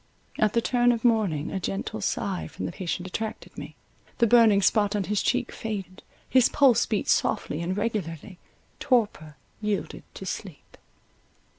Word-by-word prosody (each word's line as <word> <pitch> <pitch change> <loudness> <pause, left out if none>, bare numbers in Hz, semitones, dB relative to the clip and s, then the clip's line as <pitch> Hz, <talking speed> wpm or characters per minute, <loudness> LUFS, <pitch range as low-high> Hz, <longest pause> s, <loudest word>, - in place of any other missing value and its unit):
At 215 -1 +3
the 235 - +1
turn 245 -1 +3
of 235 0 -2
morning 205 -11 +1
a 195 - -2
gentle 200 +4 -4
sigh 195 -1 -2
from - - -6
the - - -3
patient 180 +1 -4
attracted 220 +4 -5
me, - - -8 0.4
the 235 - +4
burning 220 -3 +5
spot 205 0 +3
on 205 - 0
his 205 +1 0
cheek 250 0 0
faded—his 215 +4 -1
pulse 260 -5 +4
beat 210 - -1
softly 150 - +1
and 180 +3 -2
regularly—torpor 200 - -3 0.2
yielded 210 -1 -2
to - - -7
sleep. - - -7
210 Hz, 145 wpm, -26 LUFS, 185-230 Hz, 0.4 s, burning